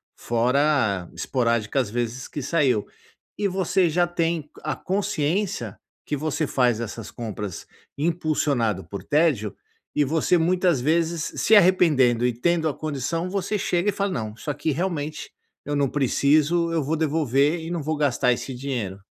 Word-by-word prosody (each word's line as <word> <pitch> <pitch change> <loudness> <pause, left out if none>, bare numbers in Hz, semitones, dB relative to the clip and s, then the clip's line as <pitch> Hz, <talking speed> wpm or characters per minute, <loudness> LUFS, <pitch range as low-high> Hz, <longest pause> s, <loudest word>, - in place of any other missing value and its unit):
fora 120 - +1
esporádicas 115 -1 0
vezes 120 +2 -3
que 145 - -6
saiu 135 -8 +1 0.5
e 205 - +1
você 190 -1 +1
já 175 +2 +2
tem 165 -3 -1
a - - -2
consciência 180 - -2 0.3
que 150 - -2
você 155 +1 -1
faz 125 -5 +2
essas 115 -1 -6
compras 105 -5 -6 0.3
impulsionado 145 - 0
por 100 - -7
tédio 145 -9 +1 0.4
e 150 - +3
você 160 +5 +2
muitas 175 -3 +2
vezes 165 +3 0
se 220 - +5
arrependendo 150 - +4
e 125 - +2
tendo 160 +7 +1
a 150 - 0
condição, 155 +4 -3
você 200 +2 -1
chega 180 0 0
e - - +3
fala: 200 0 -1
"Não, 110 -9 -3
isso 150 - -7
aqui, 145 +2 -2
realmente, 155 -2 -3 0.3
eu 145 - -2
não 140 -2 +1
preciso, 150 +5 +2
eu 160 -2 +1
vou 150 +4 -1
devolver 150 0 +1
e 160 0 -7
não 170 -2 -2
vou 155 +2 -1
gastar 130 -4 +2
esse 130 +2 -5
dinheiro". 120 -8 -4
150 Hz, 155 wpm, -24 LUFS, 125-170 Hz, 0.5 s, se